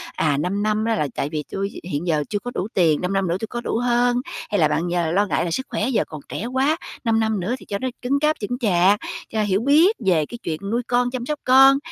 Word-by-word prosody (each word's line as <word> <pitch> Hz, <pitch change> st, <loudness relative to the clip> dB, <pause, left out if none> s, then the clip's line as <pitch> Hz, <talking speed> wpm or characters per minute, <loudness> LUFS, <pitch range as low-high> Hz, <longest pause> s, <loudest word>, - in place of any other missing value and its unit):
à, 145 Hz, -3 st, +1 dB
5 195 Hz, +7 st, -1 dB
năm 215 Hz, +1 st, 0 dB
á 225 Hz, -1 st, +1 dB
là 150 Hz, -, 0 dB
tại 140 Hz, -, -2 dB
vì 150 Hz, -1 st, -3 dB
tui 195 Hz, +1 st, -3 dB
hiện 150 Hz, +5 st, -2 dB
giờ 155 Hz, -3 st, +1 dB
chưa 205 Hz, -, -1 dB
có 245 Hz, +2 st, -6 dB
đủ 195 Hz, -, -2 dB
tiền, 165 Hz, -5 st, +3 dB
5 180 Hz, +2 st, -1 dB
năm 195 Hz, -2 st, +1 dB
nữa 170 Hz, +2 st, 0 dB
tui 220 Hz, -, -4 dB
có 240 Hz, +1 st, -5 dB
đủ 225 Hz, -, -2 dB
hơn? 245 Hz, 0 st, +2 dB, 0.3 s
Hay 205 Hz, -, +1 dB
là 155 Hz, -, +5 dB
bạn 170 Hz, +2 st, -1 dB
giờ 170 Hz, -2 st, 0 dB
lo 200 Hz, +4 st, +3 dB
ngại 185 Hz, -, 0 dB
là 170 Hz, -, -3 dB
sức 260 Hz, -, -2 dB
khỏe 225 Hz, +5 st, -1 dB
giờ 235 Hz, -, +2 dB
còn 155 Hz, -2 st, -8 dB
trẻ 225 Hz, -, -4 dB
quá, 265 Hz, +6 st, +1 dB, 0.3 s
5 225 Hz, -1 st, +2 dB
năm 220 Hz, -2 st, 0 dB
nữa 205 Hz, +8 st, -1 dB
thì -, -, -15 dB
cho 200 Hz, -, -3 dB
nó 260 Hz, -, -2 dB
cứng 275 Hz, +3 st, +1 dB
cáp, 305 Hz, +1 st, +2 dB
chững 245 Hz, +4 st, -3 dB
chạc, 200 Hz, -2 st, +3 dB, 0.3 s
cho 220 Hz, -1 st, 0 dB
hiểu 200 Hz, 0 st, +1 dB
biết 315 Hz, -, +5 dB
về 165 Hz, -5 st, +3 dB
cái 240 Hz, -, -8 dB
chuyện 155 Hz, -1 st, -3 dB
nuôi 240 Hz, +1 st, +1 dB
con, 245 Hz, 0 st, +1 dB
chăm 250 Hz, -2 st, -4 dB
sóc 300 Hz, +2 st, -3 dB
con? 270 Hz, +2 st, +7 dB
215 Hz, 275 wpm, -22 LUFS, 175-245 Hz, 0.3 s, con